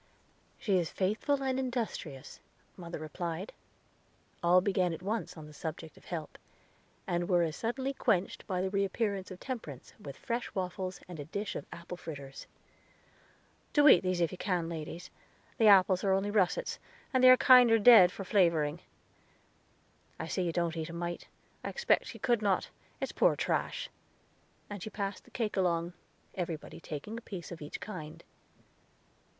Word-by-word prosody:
"She 195 -4 +1
is 170 - -2
faithful 225 +9 0
and 265 -1 0
industrious," 230 - -4 0.4
mother 170 -2 -7
replied. 170 +4 -5 0.9
All 175 +1 +5
began 185 -2 +1
at 175 - -12
once 215 -2 -3
on 155 - -9
the 150 - -13
subject 160 +1 -6
of - - -19
help, 165 -4 -6 0.7
and 175 +1 -1
were 175 -2 +4
as 160 -1 -2
suddenly 260 +4 -2
quenched 195 -8 0
by 185 -3 -1
the 190 - -2
reappearance 200 0 -1
of 185 - -9
Temperance, 215 - -7
with 140 -2 -9
fresh 235 -1 -4
waffles, 185 0 -3
and 175 -3 -9
a 145 - -5
dish 200 +6 -4
of - - -6
apple 170 +1 -8
fritters. 140 -5 -8 1.3
"Do 295 0 +6
eat 225 - +8
these 185 -1 0
if 170 - +2
you 185 - -8
can, 175 -4 -1
ladies; 165 +2 -6 0.5
the 220 - +6
apples 190 -2 +6
are 195 -1 +3
only 195 +2 0
russets, 190 -4 +1 0.3
and 255 -1 +3
they 255 - +10
are 255 - +9
kinder 250 -4 +7
dead 220 -5 +8
for 195 - -6
flavoring. 170 -5 +2 1.4
I - - -3
see 185 - -2
you 175 -2 0
don't 170 0 -1
eat 160 0 -3
a - - -7
mite; 175 0 -4 0.4
I - - -3
expected 480 - +1
you - - -10
could 240 -3 +2
not; 200 -3 +1 0.3
it's - - -3
poor - - +3
trash." - - -1 0.8
And 205 -2 -7
she 215 - -5
passed 200 -2 -4
the - - -18
cake 225 -3 -2
along, 175 -2 +1 0.4
everybody 170 -3 -5
taking 170 +9 -6
a - - -17
piece 190 -7 -8
of 170 - -8
each 150 - -6
kind. 160 -7 -8
185 Hz, 165 wpm, -31 LUFS, 170-210 Hz, 1.4 s, they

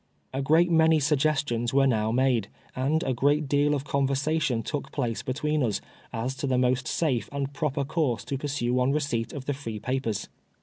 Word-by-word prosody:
A 135 - -1
great 160 +5 +4
many 160 -1 +5
suggestions 140 -5 +1
were 140 0 +5
now 110 -4 +1
made, 125 -4 +2 0.3
and 145 +6 +1
a 130 - 0
great 145 +4 +2
deal 145 +1 +2
of 140 - -3
convei*sation 140 -2 0
took 145 -2 -4
place 120 -5 -2
between 150 +3 -1
us, 110 -6 0 0.3
as 120 +3 -2
to 140 - -2
the 130 -1 +1
most 125 0 +1
safe 135 -8 0
and 140 0 -3
proper 140 -2 -1
course 145 -5 -1
to 135 - -2
pursue 130 -4 -1
on 125 +2 +2
receipt 140 -6 -1
of 140 -3 -7
the 145 - 0
free 115 -6 -6
papers. 120 -2 -2
135 Hz, 185 wpm, -27 LUFS, 125-150 Hz, 0.3 s, many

